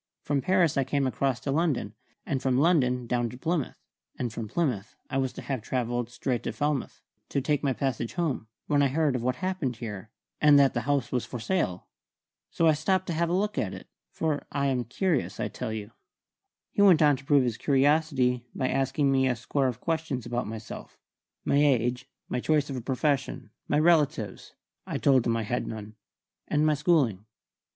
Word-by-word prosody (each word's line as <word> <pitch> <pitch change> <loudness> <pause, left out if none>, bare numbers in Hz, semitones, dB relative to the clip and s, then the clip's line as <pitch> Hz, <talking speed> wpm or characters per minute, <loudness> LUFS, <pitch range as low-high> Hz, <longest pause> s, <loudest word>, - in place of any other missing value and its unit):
From 140 -1 0
Paris 180 -1 +2
I 135 - +3
came 135 +1 0
across 130 -1 0
to 140 - -2
London, 145 -9 0 0.3
and 135 -2 -1
from 130 -1 +1
London 130 -6 +3
down 120 0 0
to 125 - -10
Plymouth, 160 +1 -2 0.4
and 120 -3 -3
from 115 -2 -5
Plymouth 120 - -2 0.2
I 135 - +1
was 130 -1 0
to - - -8
have 135 -4 -3
travelled 120 0 -2
straight 120 0 -2
to - - -3
Falmouth, 145 -2 -2 0.3
to - - 0
take 145 +1 0
my 140 - +1
passage 125 -4 -2
home, 155 -10 -1 0.2
when 145 -2 +2
I 140 - +4
heard 145 0 +1
of 125 - -1
what 125 +1 0
had 185 - -3
happened 170 -10 -2
here, 110 -2 -7 0.3
and 150 -1 +7
that 140 -2 +5
the 120 - -1
house 140 -4 +1
was 125 -2 0
for 125 - -6
sale. 110 - -1 0.6
So 165 - +1
I 160 - +6
stopped 185 +5 +1
to 170 - -1
have 170 +1 0
a - - 0
look 205 +3 0
at 95 - -2
it; - - -12 0.2
for 155 -3 -2
I 140 0 0
am 130 -3 0
curious, 155 - -1
I - - -1
tell 120 -3 -5
you." 110 0 -5 0.8
He 200 - 0
went 180 -6 +7
on 145 -1 +5
to 135 - -13
prove 140 -1 +4
his 120 -3 -1
curiosity 135 -3 +2
by 130 - 0
asking 135 +1 +1
me 130 -1 +3
a 125 - +1
score 130 +3 0
of 125 -2 -4
questions 160 -7 -2
about 120 -1 -2
myself: 110 0 -8 0.5
my 140 - +2
age, 125 -3 +2 0.2
my 125 - -2
choice 150 +1 +1
of - - -3
a 125 - -4
profession, 135 -2 -1 0.2
my 145 - +2
relatives 155 -2 +1 0.3
(I - - -2
told 130 -4 +3
him 115 0 +2
I 115 - -1
had 120 +4 -2
none), 110 -1 -7 0.5
and 150 +1 +2
my 155 - +4
schooling. 140 - +1
135 Hz, 205 wpm, -27 LUFS, 120-150 Hz, 0.8 s, and